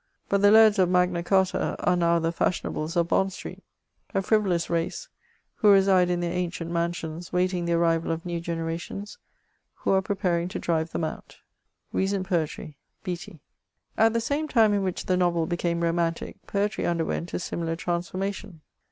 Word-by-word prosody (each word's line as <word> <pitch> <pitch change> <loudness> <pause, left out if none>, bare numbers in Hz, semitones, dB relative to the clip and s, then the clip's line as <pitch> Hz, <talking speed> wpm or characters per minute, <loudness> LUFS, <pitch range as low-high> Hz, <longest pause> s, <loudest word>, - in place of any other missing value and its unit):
But 200 0 +2
the 205 - +6
lairds 215 -1 +6
i^ 175 - 0
Magna 180 -1 +2
Charta 190 +1 +1
are 180 - +1
now 170 -1 +3
the 165 0 -1
Faskionabies 165 -2 -2
of 170 -1 +1
Bond 190 0 +2
Street; - - -9 0.5
a 195 - +1
frivolous 190 -5 +1
race, 170 - -2 0.5
who 205 -2 +6
nade 190 -2 +3
in 175 -1 0
their 170 -1 -2
ancient 170 -2 -3
mansions, 170 -1 -3
waiting 180 -1 0
the 170 - 0
artiral 165 -1 +2
of 165 +1 -3
new 170 -1 -2
generations, 170 - -5 0.6
who - - -1
are 190 0 +4
preparing 180 -3 -1
to 185 - -5
drive 165 -1 -1
them - - -2
out. 155 - -6 0.6
At 190 -4 0 1.7
the - - 0
same 290 +6 -1
time 225 -6 +4
in 200 - +1
which 185 -2 -3
the 185 - +1
novel 175 -2 +2
became 170 0 -1
romantic^ 170 0 -1
poetry 205 +1 -1
underwent 170 0 -2
a - - -1
similar 165 -2 -3
transformation. 180 +1 -4
175 Hz, 160 wpm, -26 LUFS, 170-195 Hz, 1.7 s, the